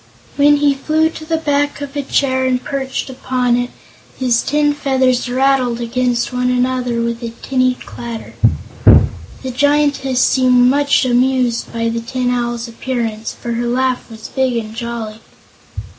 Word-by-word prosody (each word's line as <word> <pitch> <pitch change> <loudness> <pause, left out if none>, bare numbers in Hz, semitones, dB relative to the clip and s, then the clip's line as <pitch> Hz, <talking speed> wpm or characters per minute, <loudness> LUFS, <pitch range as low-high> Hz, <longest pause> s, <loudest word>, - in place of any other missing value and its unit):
When 290 +1 +5
he 290 -1 +3
flew 315 +3 +1
to 315 - -9
the 325 0 0
back 290 -2 0
of 285 0 -7
a 285 - 0
chair 260 -1 +1
and 255 -1 0
perched 270 -1 -3
upon 255 -2 0
it, 245 0 -1 0.5
his 245 -3 +2
tin 295 +1 +1
feathers 260 -3 +1
rattled 255 -2 +1
against 240 +1 -1
one 250 0 0
another 250 -1 0
with 235 0 -2
a 235 - -4
tinny 255 -1 +1
clatter. 235 -2 -8 1.1
The 260 - -3
Giantess 285 -1 +1
seemed 250 -1 +4
much 285 -1 +2
amused 250 -1 +1
by 230 0 -1
the 230 0 -2
Tin 250 +1 -2
Owl's 240 -1 -2
appearance, 230 -2 -3
for 235 - -5
her 235 +1 -1
laugh 255 +1 0
was 220 -1 -9
big 260 -2 0
and 220 -1 -5
jolly. 230 -2 -5
255 Hz, 155 wpm, -17 LUFS, 240-270 Hz, 1.1 s, When